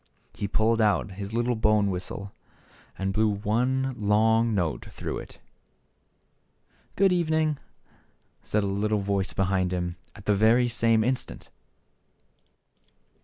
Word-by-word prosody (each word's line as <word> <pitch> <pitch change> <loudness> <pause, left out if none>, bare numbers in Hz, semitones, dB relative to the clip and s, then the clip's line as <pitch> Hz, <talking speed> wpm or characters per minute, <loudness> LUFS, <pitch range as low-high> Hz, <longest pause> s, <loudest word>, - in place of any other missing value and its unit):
He 100 - -3
pulled 110 +3 +2
out 105 -1 +2
his 100 +1 -6
little 120 +2 0
bone 105 -2 +2
whistle 95 +2 -5 0.7
and 95 0 -2
blew 110 +2 +2
one 125 +6 0
long 110 +2 +3
note 80 -10 -1
through - - -5
it. - - -11 0.8
" - - -40
Good 195 -1 +4
evening! 155 -4 +1 0.4
" - - -36 0.3
said 105 0 -1
a - - -1 0.3
voice 100 -1 -1
behind 95 -1 0
him, 90 -1 -3 0.2
at 105 -2 -13
the 105 - +3
very 115 +4 +4
same 115 -1 +2
instant. 125 +2 -3
105 Hz, 125 wpm, -26 LUFS, 100-115 Hz, 0.8 s, Good